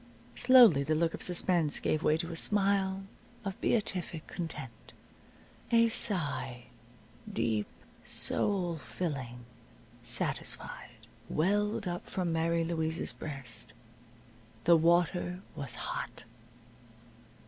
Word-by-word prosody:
Slowly 245 - +7
the 155 +3 0
look 165 +1 +1
of - - -7
suspense 175 -3 +3
gave 155 - 0
way 155 - +3
to 170 +1 -4
a - - -5
smile 195 0 +3 0.4
of 195 -1 -5
beatific 180 -7 -1
content. 150 -9 -7 0.8
A 230 0 +5
sigh 150 - 0 0.7
deep, 110 - 0 0.4
soul 180 -5 0
filling, 130 -7 -5 0.6
satisfied 120 0 -1 0.2
welled 205 +5 0
up 175 0 -5
from 180 -3 -1
Mary 165 +1 +1
Louise's 160 -1 0
breast. 120 -6 -6 0.9
The 170 0 +6
water 175 +2 +2
was 140 -6 -5
hot. - - -5
170 Hz, 100 wpm, -31 LUFS, 145-190 Hz, 0.9 s, Slowly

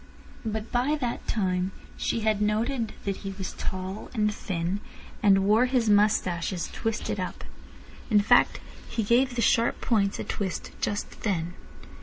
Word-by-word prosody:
But 220 0 -3
by 255 +5 +2
that 245 -3 -3
time 185 -3 0 0.2
she 230 - -1
had 215 -1 +1
noted 225 +3 0
that 195 -1 -1
he 195 -1 -6
was 190 - -4
tall 185 +2 -4
and 210 -1 +2
thin, 180 -1 -2 0.4
and 195 -2 +5
wore 220 +5 +5
his 245 -4 +2
moustaches 190 -4 +2
twisted 225 -2 -2
up. 185 - -4 0.7
In 210 - +5
fact, 205 - +4 0.3
he 225 - -1
gave 245 +4 +3
the 235 - +1
sharp 230 +3 +3
points 200 -4 +1
a - - -3
twist 190 -4 -3
just 205 - -3
then. 175 -5 -1
210 Hz, 150 wpm, -27 LUFS, 190-230 Hz, 0.7 s, and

